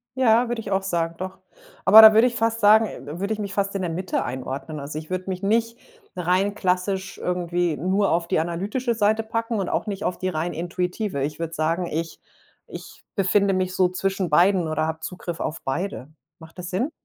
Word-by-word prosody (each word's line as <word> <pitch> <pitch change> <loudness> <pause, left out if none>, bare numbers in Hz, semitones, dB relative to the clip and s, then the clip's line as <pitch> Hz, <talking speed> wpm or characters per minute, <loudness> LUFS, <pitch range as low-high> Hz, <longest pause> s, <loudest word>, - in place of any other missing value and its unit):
Ja, 245 -2 +3
würde 240 -1 -2
ich 205 - -7
auch 195 0 +1
sagen, 170 -3 -1
doch. 185 +1 -6 0.5
Aber 220 +3 +10
da 220 0 +10
würde 225 +3 +6
ich 240 - -3
fast 225 0 0
sagen 215 -7 +3
würde 200 +3 -1
ich 215 - -6
mich 200 -1 -4
fast 200 0 -1
in 195 - -1
der 180 - -2
Mitte 185 +2 -2
einordnen. 130 +4 -5
Also 145 +2 -5
ich 155 - -12
würde 185 +1 -3
mich 185 -1 -4
nicht 230 +3 +1 0.4
rein 185 +3 +1
klassisch 190 0 -1
irgendwie 175 -2 -1
nur 190 +5 +1
auf 170 0 0
die - - +1
analytische 200 +10 -2
Seite 220 0 +1
packen 230 +1 -3
und 190 - -2
auch - - -2
nicht 200 -1 -4
auf 180 - -1
die 185 - -2
rein 170 0 -2
intuitive. 180 -1 -3
Ich 150 +2 -4
würde 165 -1 -4
sagen, 165 +3 -1
ich 165 +1 -4 0.5
ich - - -11
befinde 200 0 +2
mich 185 0 -1
so 185 -1 +3
zwischen 190 0 -2
beiden 175 +2 +3
oder 155 0 -1
habe 160 0 -4
Zugriff 175 0 -6
auf 155 - -4
beide. 150 0 -3 0.3
Macht 160 +1 -15
das 180 -1 -6
Sinn? 220 +11 -1
185 Hz, 210 wpm, -23 LUFS, 170-205 Hz, 0.5 s, Aber